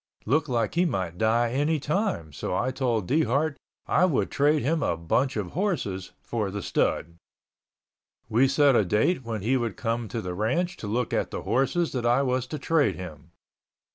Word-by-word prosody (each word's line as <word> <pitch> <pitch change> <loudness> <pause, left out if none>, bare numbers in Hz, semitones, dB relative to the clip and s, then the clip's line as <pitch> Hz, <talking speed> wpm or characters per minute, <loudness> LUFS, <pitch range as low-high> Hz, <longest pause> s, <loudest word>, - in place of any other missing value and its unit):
Looked 150 +5 +1
like 115 -3 0
he 175 - +3
might 95 - -2
die 115 +2 +2
any 150 +4 +1
time, 150 - -1
so 90 - -3
I 130 - 0
told 120 -7 -1
Dehart 145 +1 +1 0.3
I 180 - +3
would 165 -8 0
trade 145 +1 +2
him 155 +4 +1
a 85 - 0
bunch 120 +11 0
of 100 -4 -3
horses 140 - -2
for 110 -4 -2
the 100 0 -5
stud. 85 +1 -1 1.1
We 120 +4 +3
set 140 0 +4
a 110 - +4
date 110 - +1
when 110 -4 -4
he 130 +5 +2
would 115 -5 -3
come 115 0 -2
to 115 - -4
the 90 -4 -4
ranch 170 - 0
to 105 - -6
look 120 +3 -1
at - - 0
the - - -5
horses 135 +8 +1
that 120 -2 -1
I 125 +3 +3
was 130 -1 0
to 150 - -4
trade 145 - +2
him. 80 -4 -9
120 Hz, 190 wpm, -26 LUFS, 105-145 Hz, 1.1 s, set